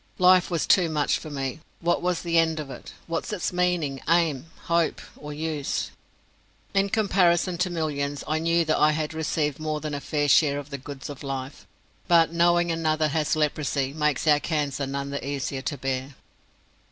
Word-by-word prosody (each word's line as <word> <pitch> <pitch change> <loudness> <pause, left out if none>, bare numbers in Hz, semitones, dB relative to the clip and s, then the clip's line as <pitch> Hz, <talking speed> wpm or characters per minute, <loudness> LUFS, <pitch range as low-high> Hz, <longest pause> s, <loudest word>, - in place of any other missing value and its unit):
Life 185 0 +5
was 170 -3 0
too 180 -3 +4
much 150 -2 +1
for 155 - -8
me. 135 0 -4 0.2
What 175 0 +1
was 180 -1 -1
the 170 -1 +3
end 160 -1 +1
of 145 -3 -6
it, 125 - -10
what 165 +4 -3
its 185 -3 -2
meaning, 175 -7 0
aim, 165 -4 +2 0.2
hope, 170 -1 +1 0.2
or 150 0 -9
use? 150 -1 -3 0.8
In 195 0 +2
comparison 185 -4 +2
to 180 0 +1
millions 145 -4 -2
I 155 +1 0
knew 165 +1 +2
that 155 - +1
I 155 0 +5
had 155 0 -2
received 155 -2 -1
more 155 -1 -2
than 150 0 -5
a 145 - -3
fair 145 -1 -1
share 145 0 +4
of 145 +1 -7
the 140 - -5
goods 135 0 -8
of 145 -2 -8
life; 135 0 -6 0.4
but 165 -1 +4
knowing 175 0 +3
another 155 -1 +1
has 155 +1 0
leprosy 145 -3 0
makes 150 -3 0
our 150 -2 +5
cancer 145 -3 -2
none 140 +1 -4
the 140 - -4
easier 135 -1 -3
to 145 +1 -3
bear. 135 +1 -3
155 Hz, 185 wpm, -25 LUFS, 140-170 Hz, 0.8 s, Life